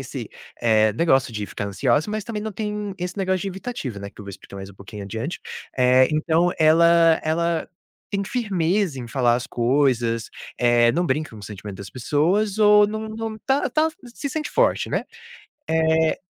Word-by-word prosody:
esse - - -6 0.7
negócio 135 -8 +2
de 105 -1 -4
ficar 100 - -5
ansiosa. 145 - +1
Mas 215 -1 -3
também 215 -3 -4
não 220 -1 -4
tem 210 -1 -4
esse 180 +2 -4
negócio 190 -2 0
de 195 - -2
evitativo, 190 - -5
né, 100 0 -7
que - - -14
eu - - -9
vou 100 - -7
explicar 100 0 -12
mais 95 0 -7
um 100 - -14
pouquinho 100 +1 -9
adiante. 115 - -5 0.4
Eh, 130 +1 +5
então 165 +3 +2
ela 165 +1 +5
ela 165 +1 0 0.4
tem 200 -1 -1
firmeza 190 - 0
em 120 - -8
falar 120 -1 +2
as 125 - -5
coisas, 120 -2 +1 0.3
eh, 120 -1 +4
não 175 +4 0
brinca 155 0 -1
com 110 - -12
o - - -12
sentimento 100 -1 -8
das 100 -1 -8
pessoas, 180 - 0
ou 210 -1 +6
não 215 +1 -4
não 220 0 -5
tá 270 +1 +1
tá 315 +1 +2 0.3
se 285 - -4
sente 305 +2 -4
forte, - - +1
né. - - -1 0.6
Eh, 160 0 +2
160 Hz, 185 wpm, -23 LUFS, -, 0.7 s, ou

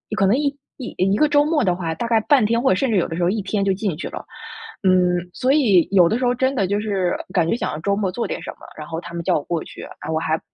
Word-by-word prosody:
可 195 - +2
能 225 +7 +3
一 290 -1 0 0.3
一 255 - -7
一 195 +3 +2
个 305 - +4
周 290 0 +4
末 305 -4 +1
的 180 -3 +1
话， 165 -3 -3
大 235 - -3
概 225 -1 +3
半 270 -3 +3
天 230 +2 +1
或 265 - +2
者 185 - +4
甚 260 +2 0
至 205 - +2
有 175 - +1
的 165 - -5
时 175 - 0
候 175 - +3
一 210 +1 -1
天 200 +1 -1
就 195 - +2
进 190 -5 -3
去 - - -5
了。 - - -7 0.6
嗯， 180 -1 +3 0.2
所 260 +1 0
以 210 - +4
有 180 -4 +5
的 225 - +1
时 255 - 0
候 245 0 +2
真 260 +2 +1
的 195 -5 +1
就 205 +1 0
是 195 -4 -1 0.2
感 170 -4 +2
觉 - - +2
想 - - -3
要 150 - -5
周 200 +4 0
末 195 -3 -1
做 235 - -3
点 - - -5
什 - - -6
么， - - -20 0.2
然 155 - -8
后 165 0 -4
他 170 - -10
们 170 0 -4
叫 - - +1
我 145 - -4
过 170 -2 -2
去， - - -11 0.2
唉， - - -7
我 160 - 0
还 160 0 -1
200 Hz, 340 characters per minute, -21 LUFS, 175-235 Hz, 0.6 s, 有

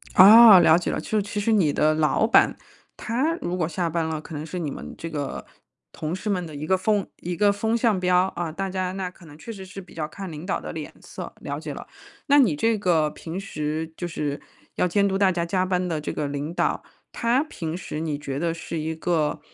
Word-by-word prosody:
哦， 210 +1 +10
了 165 -1 +6
解 175 - -2
了。 - - -2
就 215 -1 -1
其 205 +1 -4
实 205 +3 +1
你 190 -9 +3
的 155 +2 +2
老 155 +7 +2
板， - - +4 0.4
他 260 +8 0
如 175 - -2
果 160 -3 0
下 170 +1 -2
班 165 0 -1
了， 160 -1 -3
可 155 +1 -9
能 150 +1 -5
是 180 +2 -5
你 160 -4 -2
们 - - -8
这 165 - -6
个 145 -3 -4 0.5
同 155 +1 -4
事 210 +3 -5
们 180 -3 -1
的 160 - -9
一 150 +2 -5
个 190 - +3
风 200 +1 0
一 175 +1 -4
个 205 +3 +4
风 220 +3 0
向 230 -4 +2
标。 180 0 +3
啊， 170 -2 -3
大 195 +4 -3
家 185 -1 -2
那 190 -2 -3
可 180 -1 -18
能 150 -1 -13
确 230 - -8
实 190 -2 -9
是 195 +1 -9
比 180 - -16
较 155 -2 -3
看 195 +4 -8
领 155 +2 -8
导 - - -1
的 - - -7
脸 - - -7
色， - - -8
了 - - -5
解 - - -6
了。 - - -9 0.4
那 285 0 +6
你 205 - +4
这 225 +8 +1
个 170 -6 +2
平 170 +3 -6
时 160 -3 -4
就 175 - -5
是 150 -3 -3 0.3
要 180 - +2
监 200 +3 +2
督 195 0 0
大 195 -2 +4
家 170 -1 -1
加 185 +2 0
班 180 -1 0
的 160 -3 -2
这 - - -3
个 150 - -2
领 145 +3 -4
导， - - 0 0.3
他 235 +3 +2
平 165 - -5
时 155 -3 -5
你 155 -3 -2
觉 140 -2 -5
得 165 +1 0
是 165 0 -5
一 160 +1 -2
个， 160 -2 0
175 Hz, 260 characters per minute, -24 LUFS, 155-195 Hz, 0.5 s, 哦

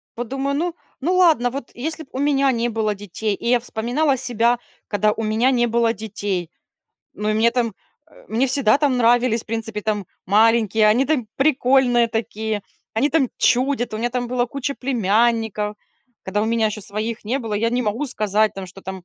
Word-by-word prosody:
вот 240 0 -4
думаю: 270 +3 -2
"Ну 340 +2 -2 0.3
ну 350 +7 +1
ладно, 320 -9 +4
вот 265 0 -7
если 315 +5 -4
б 275 - -21
у 260 - -5
меня 275 -1 +3
не 235 -1 0
было 215 -2 -1
детей",- 205 +1 -3
и 235 - -4
я 245 0 +4
вспоминала 245 +5 0
себя, 240 -1 +1 0.3
когда 210 0 +2
у 225 - -4
меня 220 +4 +2
не 240 -2 +2
было 230 0 +2
детей. 200 -5 -4 0.7
Ну 210 - -3
и 215 - +1
мне 225 +2 +4
там, 235 -3 -1 0.3
а, 320 - -20
мне 235 +5 +1
всегда 265 -2 +3
там 280 -3 +2
нравились 240 -1 +3
в - - -32
принципе 225 -1 -4
там 210 -3 -2 0.2
маленькие, 220 +1 +4
они 235 +5 +4
там 275 -6 0
прикольные 260 -4 +3
такие, 220 -1 -3 0.3
они 240 +6 +2
там 285 -4 +2
чудят, 250 -2 +1
у - - -3
меня 240 +2 -1
там 245 0 -2
была 245 0 0
куча 280 +2 -3
племянников, 225 -3 0 0.5
когда 205 +2 -1
у - - +1
меня 225 0 +1
еще 215 0 -4
своих 215 +3 -4
не 245 +6 -1
было, 225 -5 -4
я 230 +3 +1
не 245 +1 0
могу 230 +6 -1
сказать 215 -3 +1
там, 195 -1 -6
что 185 +2 -13
там 190 -1 -7
230 Hz, 200 wpm, -21 LUFS, 215-255 Hz, 0.7 s, ладно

